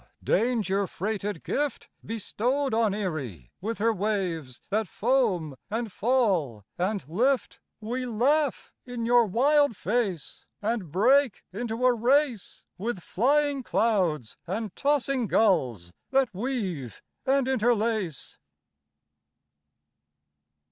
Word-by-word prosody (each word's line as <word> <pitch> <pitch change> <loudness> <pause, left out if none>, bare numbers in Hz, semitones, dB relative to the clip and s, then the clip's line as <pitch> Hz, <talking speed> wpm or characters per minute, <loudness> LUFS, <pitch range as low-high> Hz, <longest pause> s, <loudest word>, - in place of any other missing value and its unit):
danger 210 -5 +1
freighted 205 +1 -3
gift 290 0 -2 0.2
Bestowed 245 +5 -1
on 225 -2 +3
Erie 140 - -4
with 225 +4 -3
her 225 +2 +2
waves 180 - -2
that 215 0 +1
foam 210 - +1 0.2
and 225 0 -3
fall 185 - +1
and 190 -3 -2
lift, 250 - 0 0.2
We 245 +4 -3
laugh 270 +6 +1
in 245 -2 -5
your 240 -1 +5
wild 280 +3 +3
face, 200 - -2
And 210 -6 -2
break 255 - +3
into 230 +3 -2
a 250 - +6
race 245 -1 +1
With 205 -3 -3
flying 285 +5 +2
clouds 180 - 0
and 205 +1 -3
tossing 275 -4 +1
gulls 125 - +1 0.2
that 265 -5 +2
weave 185 - -4 0.2
and 270 -1 +3
interlace. 220 - 0
220 Hz, 105 wpm, -27 LUFS, 185-250 Hz, 0.2 s, a